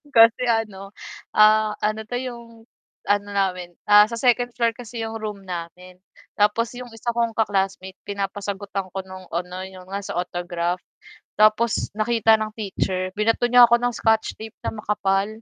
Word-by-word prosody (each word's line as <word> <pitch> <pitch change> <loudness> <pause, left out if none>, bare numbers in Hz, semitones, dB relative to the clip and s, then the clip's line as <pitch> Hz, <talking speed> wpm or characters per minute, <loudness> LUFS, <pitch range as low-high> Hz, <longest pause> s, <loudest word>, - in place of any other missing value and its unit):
Kasi 230 +2 +6
ano, 210 -4 -1 0.4
ah, 215 0 +5
ano 215 +1 0
'to 245 - -4
yung 240 -2 -6 0.6
ano 205 0 +1
namin 180 -3 -1
sa 210 +2 +6
2nd 245 0 +1
floor 235 -1 +2
kasi 230 -1 -7
yung 225 0 -5
room 210 -2 -6
namin, 180 +1 -8 0.4
tapos 225 +3 +2
yung 250 0 -8
isa 235 +1 -2
kong 230 -1 -1
ka-classmate, 195 -3 -1
pinapasagutan 200 -1 -4
ko 190 - -3
nung 185 -1 -11
ano 180 +2 -4
yung 185 0 -13
nasa 200 -2 -4
sa 175 - +1
autograph, 175 0 -3 0.6
tapos 215 +1 +3
nakita 225 0 +3
ng 215 0 -3
teacher, 185 -3 -2
binato 225 +3 +1
niya 245 0 +8
ako 235 - +5
ng 245 0 0
scotch 220 0 +1
tape 220 0 -9
na - - -2
makapal. 200 -2 0
210 Hz, 155 wpm, -23 LUFS, 190-225 Hz, 0.6 s, niya